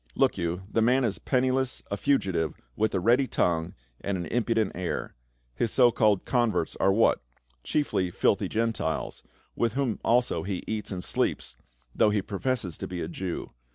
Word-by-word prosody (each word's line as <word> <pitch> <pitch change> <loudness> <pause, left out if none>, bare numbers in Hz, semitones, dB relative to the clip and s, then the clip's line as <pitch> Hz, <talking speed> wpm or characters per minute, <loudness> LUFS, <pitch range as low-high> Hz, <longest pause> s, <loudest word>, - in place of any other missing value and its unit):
Look - - +3
you, 85 +2 -2
the 110 +2 0
man 125 +4 +4
is 110 -5 0
penniless, 130 0 0
a - - +1
fugitive, 95 - 0 0.2
with 110 -1 0
a - - +2
ready 120 +7 +3
tongue 85 -4 0 0.3
and 100 -1 -1
an 90 - -4
impu 115 -1 0
dent 110 -3 +1
air. 90 0 -3 0.4
His 85 - 0
so 125 0 +5
called 105 -4 +2
converts 120 -9 +1
are 95 - +4
what? 110 +4 +3 0.4
Chicfl)' 95 -12 0
filthy - - +1
Gentiles; 110 -8 -1 0.3
with 115 -2 0
whom 130 -5 -1
also 120 -7 +2
he 95 +1 -4
eats 110 -1 -3
and 90 -2 -3
sleeps, - - -1 0.4
though 105 - +4
he 105 -2 0
professes 100 - -2
to - - -4
be 90 -1 -5
a - - -3
Jew. 90 +1 -5
105 Hz, 175 wpm, -27 LUFS, 90-120 Hz, 0.4 s, so